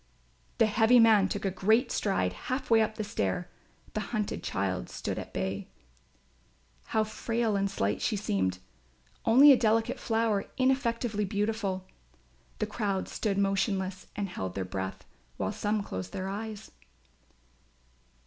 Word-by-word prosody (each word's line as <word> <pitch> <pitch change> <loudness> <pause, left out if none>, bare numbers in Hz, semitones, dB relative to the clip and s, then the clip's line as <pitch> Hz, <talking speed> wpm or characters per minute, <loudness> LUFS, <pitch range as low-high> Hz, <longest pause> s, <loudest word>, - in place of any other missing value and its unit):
The 225 - +5
heavy 225 +3 +5
man 215 -4 +6
took 205 0 -3
a 195 - +1
great 220 +7 +2
stride 140 - 0 0.2
half 260 -1 -2
way 225 -1 +7
up 215 0 0
the 215 - -3
stair. 175 - -2 0.4
The - - -1
hunted 210 0 -3
child 95 -2 -2
stood - - -4
at - - -8
bay. 95 0 -3 1.2
How 220 - +1
frail 225 0 -1
and 200 0 +1
slight 105 - -1
she 215 - +1
seemed; 95 - 0 0.7
only 270 +6 +8
a - - +9
delicate 225 -1 +1
flower 225 -3 +1
ineffectively 240 -5 +1
beautiful. 200 -2 -1 0.7
The - - 0
crowd 205 -3 -2
stood 205 -3 -1
motionless 195 -1 0
and 205 -1 -2
held 95 - -5
their 95 -1 -2
breath, 95 0 -5 0.3
while - - -1
some 210 0 -1
closed 95 - -6
their 190 - -3
eyes. 215 +1 -6
205 Hz, 140 wpm, -29 LUFS, 185-225 Hz, 1.2 s, a